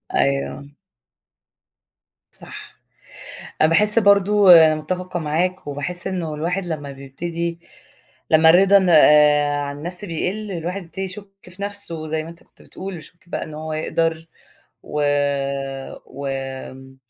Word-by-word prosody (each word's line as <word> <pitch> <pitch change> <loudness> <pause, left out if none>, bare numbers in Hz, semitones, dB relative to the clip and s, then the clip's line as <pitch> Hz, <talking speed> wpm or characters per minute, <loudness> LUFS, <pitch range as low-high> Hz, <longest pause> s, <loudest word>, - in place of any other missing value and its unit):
أيوه. 140 +1 -1 1.6
صح، - - -13 0.8
أنا 155 - +5
باحس 210 +7 +5
برضه 200 -1 +5
أنا 155 - +2
متفقة 180 +3 -4
معاك 175 +5 -2
وباحس 145 +5 -5
إنّه 175 -5 -3
الواحد 175 +5 -3
لمّا 145 -4 -5
بيبتدي 170 +5 -5 0.7
لمّا 160 0 +6
الرِضا 195 +3 +5 0.9
عن 140 0 -5
النَفْس 175 +5 -2
بيقِلّ 200 +4 -4
الواحد 180 +3 -4
بيبتدي 180 +3 -8
يشُكّ 195 +2 -7
في 185 +2 -11
نفْسُه 175 -6 -5
زي 155 0 -2
ما 160 - -10
أنت 170 - -16
كنت - - -23
بتقول 190 -1 -8
يشُكّ 170 +2 -14
بقى - - -3
إن 155 - -10
هو 155 +1 -6
يقدر 165 +1 -2 0.6
و 150 - -4 1.0
و 140 +1 -9
آآ، 135 0 -7
165 Hz, 125 wpm, -21 LUFS, 150-185 Hz, 1.6 s, لمّا